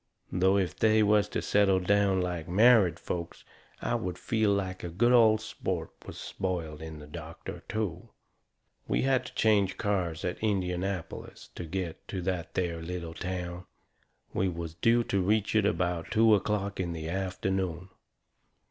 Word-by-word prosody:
Though 95 +2 +3
if 95 -4 0
they 110 -1 +4
was 105 0 +3
to - - -2
settle 100 -2 +3
down 100 0 +2
like 90 -2 -3
married 100 -3 +5
folks 85 -1 -5 0.4
I - - 0
would 90 -1 -2
feel 110 -3 +1
like 95 -2 -2
a 85 - -3
good 115 +9 +2
old 110 -3 +6
sport 110 - -4 0.2
was - - -8
spoiled 80 -5 -4
in 80 -1 -7
the 75 - -10
doctor, 80 +1 -8
too. 100 -6 -3 0.8
We - - +1
had 130 -1 +2
to - - -12
change 100 -4 +3
cars 90 -6 -1
at 90 - -3
Indianapolis 95 -4 -3
to 85 - -6
get 90 -1 -5
to 95 - -4
that 90 -2 -3
there 85 -2 -1
little 85 -1 -5
town. 90 0 -5 0.7
We 95 - +1
was 85 -2 -5
due 115 +8 +3
to 100 -4 0
reach 105 +3 +1
it 105 -2 +4
about 90 -3 -1
two 110 -1 +5
o'clock 100 -1 0
in 85 -2 -1
the 80 -1 -5
afternoon. 95 0 -2
95 Hz, 160 wpm, -29 LUFS, 85-105 Hz, 0.8 s, old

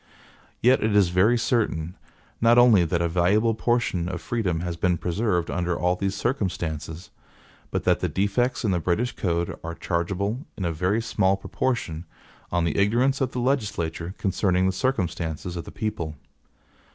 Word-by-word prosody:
Yet 125 +2 +5
it 105 -1 +1
is 100 -4 +5
very 100 +7 +3
certain, 95 -8 0 0.5
not 115 +1 +5
only 120 -7 +7
that 85 +1 0
a - - +2
valuable 95 +7 +2
portion 110 -7 0
of 90 -2 -4
freedom 90 -8 -1
has 90 -1 -3
been 90 +1 +1
preserved 90 -1 -1
under 90 -1 -1
all 90 +1 +1
these 95 +1 -2
circumstances, 85 - -3 0.6
but - - -2
that - - +3
the - - -1
defects 120 +6 0
in 105 - +2
the 90 - +1
British 100 +9 0
code 85 -2 -1
are 85 +1 -5
chargeable, 100 - -2
in 95 - -3
a 85 - 0
very 95 +8 0
small 95 -4 +1
proportion, 95 -6 -2 0.5
on 85 -1 +1
the 85 +2 0
ignorance 125 +7 +2
of 130 -1 0
the 125 - -2
legislature 105 - -1
concerning 95 -1 +1
the 95 - +3
circumstances 90 - -2
of 85 -2 -5
the - - -9
people. 85 -8 -4
95 Hz, 165 wpm, -25 LUFS, 85-115 Hz, 0.6 s, only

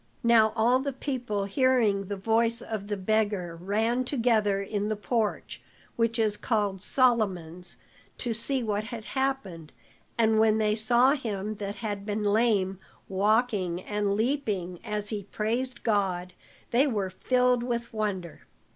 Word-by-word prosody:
Now 225 -2 +5
all 240 +3 +3
the 275 +1 -3
people 245 -7 -3
hearing 215 -3 +2
the 200 +2 -4
voice 225 +3 +1
of 215 -4 -5
the 205 -1 -2
beggar 205 -3 0
ran 220 +8 0
together 230 -6 +1
in 205 +1 -2
the 215 - 0
porch, 210 +1 -2 0.3
which 230 0 +1
is 215 -2 +1
called 205 -5 -1
Solomon's, 190 -8 +2 0.4
to 240 -2 -2
see 255 +3 -1
what 210 -1 -1
had 230 -1 -7
happened; 210 - -3 0.5
and 220 -1 +3
when 220 -1 +4
they 215 -1 +2
saw 235 +4 +4
him 215 -6 -3
that 200 0 -4
had 205 -3 -4
been 210 +1 -2
lame, 205 -3 +2 0.3
walking 200 -2 +1
and 205 +1 -1
leaping 210 - -1
as 210 -2 -3
he 210 -2 -3
praised 235 +5 -2
God, 185 -5 0 0.4
they 260 +5 +4
were 205 -7 -1
filled 250 +4 +2
with 235 -1 -3
wonder. 200 -6 -4
215 Hz, 145 wpm, -27 LUFS, 200-235 Hz, 0.5 s, Now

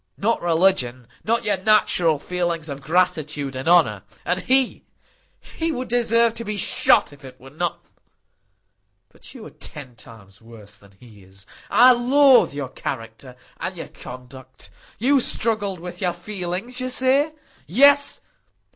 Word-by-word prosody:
"Not 230 +3 -1
religion; 165 -8 0 0.2
not 230 +1 0
your 205 -2 0
natural 185 -5 +2
feelings 170 0 -3
of 140 0 -7
gratitude 155 -5 -1
and 130 +5 -3
honour. 155 - +3 0.2
And 180 +1 -1
he—he 270 +5 -4
would 255 -3 -5
deserve 235 -1 +2
to 230 - -7
be 210 -1 -5
shot, 180 - +2
if 145 - -18
it 130 - -13
were 135 +1 -15
not——But 170 +3 -11
you - - -11
are - - -11
ten 130 -5 -8
times 110 -4 -15
worse 110 -2 -15
than 100 -1 -20
he 110 -5 -17
is. 95 +1 -11 0.2
I 245 +5 +6
loathe 260 +2 +4
your 140 -2 -6
character 120 0 -8 0.2
and 185 -1 -5
your 165 - -8
conduct. 130 +1 -13 0.3
You 270 +5 +2
struggled 215 -6 +2
with 180 +4 -9
your 180 -2 0
feelings, 185 +6 -6
you 255 - -3
say. 265 +4 +2 0.3
Yes! 280 - +4
175 Hz, 140 wpm, -21 LUFS, -, 0.3 s, I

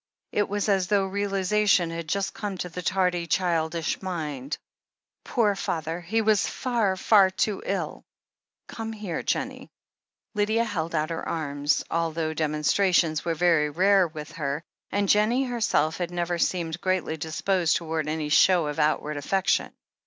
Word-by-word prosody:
It 205 - 0
was 205 +1 -1
as 195 -3 +2
though 200 -2 +2
realization 195 -2 +1
had 165 -1 -5
just 200 +2 -1
come 205 -3 -4
to 180 - -4
the 180 +2 -6
tardy, 180 -2 0
childish 165 -1 0
mind. 150 -7 -4 0.7
"Poor 220 -5 +2
father! 165 -2 -3
He 220 +6 0
was 215 -2 +3
far, 230 -7 0
far 195 -1 +5
too 195 +2 -1
ill. - - -3 0.6
Come 225 0 -6
here, 205 -6 -4
Jennie." - - -3 0.6
Lydia 215 +2 +1
held 170 -7 -3
out 155 +1 0
her 165 - -4
arms, 145 -2 0
although 165 -1 -1
demonstrations 155 +2 +2
were 165 -1 -1
very 165 -3 +3
rare 190 +4 +4
with 155 -2 -8
her, 145 0 -3 0.3
and 200 0 0
Jennie 215 +6 +3
herself 225 - 0
had 175 -2 -2
never 175 0 -2
seemed 170 -2 -1
greatly 185 -4 0
disposed 160 +2 0
towards 160 -2 -2
any 155 -1 -2
show 175 +2 +5
of 150 -1 -4
outward 150 0 +1
affection. 190 +7 0
175 Hz, 150 wpm, -26 LUFS, 160-200 Hz, 0.7 s, far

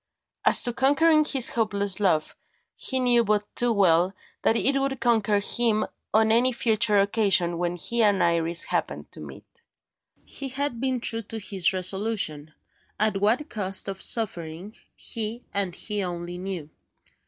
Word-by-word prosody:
As - - +6
to 240 - +3
conquering 305 +5 +3
his 265 -5 +3
hopeless 200 -4 -1
love, 170 -7 0 0.4
he 260 - -3
knew 245 -2 +3
but 210 -1 0
too 245 0 0
well 185 -2 +2 0.3
that 225 - +2
it 275 +4 +2
would 270 -1 -2
conquer 220 -3 +1
him, 220 +1 0 0.3
on 220 +1 +3
any 245 +3 +3
future 220 -3 +1
occasion 195 -4 +1
when 175 0 -2
he 235 +7 -2
and 205 -3 +3
Iris 170 0 +2
happened - - -4
to - - -11
meet. 470 - -13 0.6
He 275 -1 -7
had 265 -3 -3
been 260 -2 -1
true 230 -1 +1
to 225 +1 -6
his 195 -4 +1
resolution, 185 -5 -1 0.5
at 215 -1 +1
what 235 +9 +1
cost 195 -7 -1
of 195 -1 -4
suffering 185 -4 -1 0.2
he, 225 +2 -4
and 195 -3 -2
he 210 0 -4
alone 175 -2 -5 0.2
knew. 170 -6 -6
210 Hz, 155 wpm, -25 LUFS, 185-235 Hz, 0.6 s, As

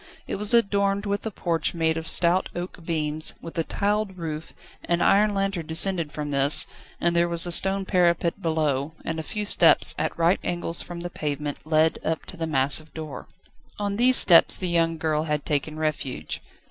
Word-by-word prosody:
It - - -5
was 210 +1 +3
adorned 200 -3 +1
with 200 +2 -3
a - - -2
porch 170 -5 -3
made 160 -1 0
of 165 0 -5
stout 175 +3 +4
oak 175 0 -8
beams, 155 -1 -2
with 165 - -11
a - - 0
tiled 205 +1 -3
roof; 160 -2 -7 0.3
an 170 0 -1
iron 205 +3 +2
lantern 195 -5 -3
descended 165 -1 +2
from 150 -1 -6
this, 140 +1 +5 0.3
and 170 0 0
there 170 0 +1
was 170 0 +5
a 175 - -2
stone 195 +3 +6
parapet 175 -1 0
below, 155 -3 -2
and 160 0 -4
a - - -3
few 210 +6 -4
steps, - - +4
at - - -3
right 170 +3 +1
angles 175 -1 -2
from 175 -1 -9
the 175 0 -7
pavement, 145 -2 -5
led 160 0 +1
up 160 0 -3
to - - -10
the 165 -2 -5
massive 145 +1 0
door. 155 -3 -9 0.5
On 205 -1 -3
these 250 +2 +5
steps 170 -3 +5
the 185 - -3
young 165 -1 0
girl 155 0 -2
had 150 -2 -3
taken 150 +1 -3
refuge. 140 - -5
165 Hz, 190 wpm, -23 LUFS, 155-190 Hz, 0.5 s, stone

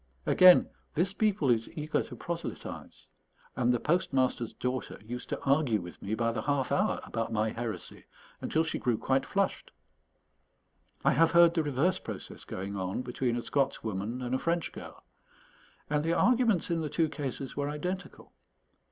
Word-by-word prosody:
Again, 185 0 +7 0.3
this 180 +5 +1
people 200 - +2
is 115 -1 +1
eager 155 +1 0
to - - -8
proselytize; 170 0 -6 0.5
and 125 0 +2
the 120 - +1
postmaster's 130 -7 +1
daughter 125 0 -4
used 125 +2 -6
to - - -2
argue 135 -5 +3
with 85 -3 -10
me 105 +2 -2
by 115 0 +1
the 115 - -3
half 140 -2 0
hour 210 +3 +2
about 115 0 -3
my 110 0 +1
heresy, 115 -1 -5 0.4
until 160 - +1
she 160 - -3
grew 120 -3 +1
quite 135 +3 0
flushed. 200 -1 -1 1.4
I - - +6
have 165 +2 +4
heard 170 -1 +7
the 165 - +2
reverse 150 +5 +1
process - - -8
going 100 +2 -5
on 95 +5 -2
between 125 -1 -1
a 120 - -3
Scots 140 -2 0
woman 110 +4 -3
and 125 0 -3
a 130 - +1
French 170 0 -1
girl; - - -10 0.8
and 150 0 0
the 165 +1 +1
arguments 230 -4 +3
in 165 -1 +1
the 155 - -2
two 160 +2 +2
cases 135 -3 -5
were 145 0 -1
identical. 180 +6 -5
140 Hz, 170 wpm, -30 LUFS, 120-165 Hz, 1.4 s, Again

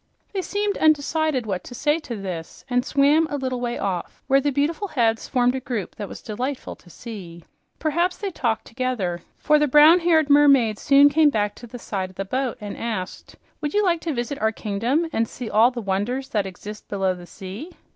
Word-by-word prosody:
They 390 - -1
seemed 405 +3 -2
undecided 310 -3 +2
what 190 -4 -3
to 245 - -9
say 295 +5 +1
to 245 -7 -6
this 185 -5 -7
and 245 0 +2
swam 290 +4 +3
a 290 - -2
little 255 -2 -3
way 240 -1 -2
off, 185 -3 -4
where 275 +1 +3
the 290 - +1
beautiful 300 +8 -1
heads 230 - 0
formed 250 -2 +2
a 265 - -2
group 235 -6 -4
that 205 -2 -5
was - - -10
delightful 250 +5 -4
to 175 - -20
see. 175 -5 -9 0.3
Perhaps 340 +4 0
they 400 -2 -4
talked 230 -8 -1
together, 225 -9 -2 0.2
for 300 0 +3
the 300 - +3
brown 300 +5 +7
haired 330 -3 +3
mermaid 275 -7 +5
soon 280 0 +6
came 300 +1 +4
back 210 -5 0
to 240 - -12
the 245 - -9
side 195 -5 -4
of 185 - -18
the 195 - -4
boat 255 +4 -2
and 205 -2 -6
asked, 205 -6 -5 0.3
"Would 295 +2 -3
you 420 - +3
like 345 -3 +2
to 330 - -2
visit 245 +1 -3
our 220 0 +2
kingdom 230 +10 -1
and 225 0 +1
see 240 0 -7
all 225 +3 +5
the 245 -2 -6
wonders 210 +7 -2
that 205 -3 0
exist 210 +3 -9
below 195 -2 0
the 175 -1 -11
sea?" 195 - -8
245 Hz, 210 wpm, -23 LUFS, 210-295 Hz, 0.3 s, brown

